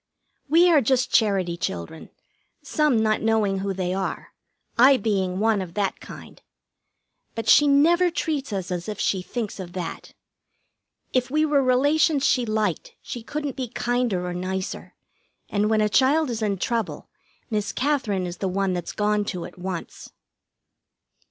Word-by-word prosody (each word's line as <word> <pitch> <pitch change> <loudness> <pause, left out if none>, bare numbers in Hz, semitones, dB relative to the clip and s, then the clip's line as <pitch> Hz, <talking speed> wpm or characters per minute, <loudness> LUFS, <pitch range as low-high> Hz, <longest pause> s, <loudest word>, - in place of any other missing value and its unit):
We 335 +4 +6
are 305 -4 +5
just 255 +1 +1
Charity 195 -6 +2
children, 90 - -5 0.5
some 300 -6 +1
not 215 0 +1
knowing 215 -3 +1
who 195 +1 -2
they 185 -1 -2
are, 190 0 -4 0.4
I 260 +3 +6
being 195 -5 -1
one 215 0 +2
of 175 -2 -8
that 200 -2 -1
kind; - - -12 0.9
but 225 -1 -4
she 295 - +6
never 335 +6 +4
treats 300 -6 -3
us 190 -3 -4
as 175 +2 -3
if 210 - -5
she 190 - 0
thinks 215 +1 -5
of 175 -2 -7
that. 175 -3 -6 1.0
If 255 -1 +1
we 305 +3 +2
were 290 -2 +3
relations 285 +3 +3
she 250 -2 +2
liked, 215 -5 -2
she 240 - -6
couldn't 290 +3 -4
be 260 -2 -3
kinder 240 -6 -1
or 180 - -3
nicer, 185 +1 -5 0.5
and 210 +1 +1
when 220 -1 +2
a 210 - +3
child 270 +6 +3
is 225 -1 -4
in 205 -2 0
trouble 230 +4 -3 0.4
Miss 210 -2 -1
Katherine 255 -9 0
is 175 0 -6
the 195 - -2
one 190 0 0
that's 175 -2 -4
gone 210 0 +1
to 180 -4 -4
at - - -12
once. 180 -2 -6
215 Hz, 160 wpm, -24 LUFS, 190-260 Hz, 1.0 s, We